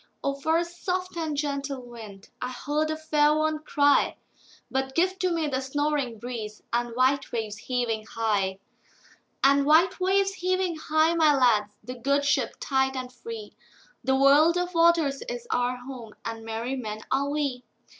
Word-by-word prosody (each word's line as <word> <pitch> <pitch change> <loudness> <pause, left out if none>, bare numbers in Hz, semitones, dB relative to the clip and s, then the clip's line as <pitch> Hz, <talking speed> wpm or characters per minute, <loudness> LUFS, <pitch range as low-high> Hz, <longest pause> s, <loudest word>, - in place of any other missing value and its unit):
"O 280 - 0
for 315 +4 +1
a 340 - +1
soft 360 +1 -4
and 315 -3 -2
gentle 280 -2 -2
wind!"I 225 0 -9
heard 295 +4 -2
a 315 - -2
fair 300 -1 +3
one 310 0 0
cry:But 280 -2 -1
give 370 +3 +1
to 365 -1 +1
me 330 -2 0
the 265 -2 -1
snoring 280 -3 -1
breezeAnd 235 0 -4
white 265 +2 +2
waves 215 -3 -3
heaving 230 -4 -2
high; 205 -4 0 0.9
And 280 +1 +5
white 320 +6 +4
waves 390 +1 +2
heaving 370 -2 0
high, 315 +1 +2
my 315 -3 +4
lads, 215 -6 +3
The 250 - -6
good 280 +3 +1
ship 280 - +1
tight 265 -1 0
and 255 -1 -5
free—The 450 - -6
world 290 +5 +5
of 355 0 -2
waters 330 -5 +3
is - - -5
our 245 0 0
home, 245 -3 -9
And 225 0 -5
merry 225 +4 -3
men 215 -4 -5
are 275 +2 +1
we. 285 -4 -2
280 Hz, 155 wpm, -26 LUFS, 245-315 Hz, 0.9 s, And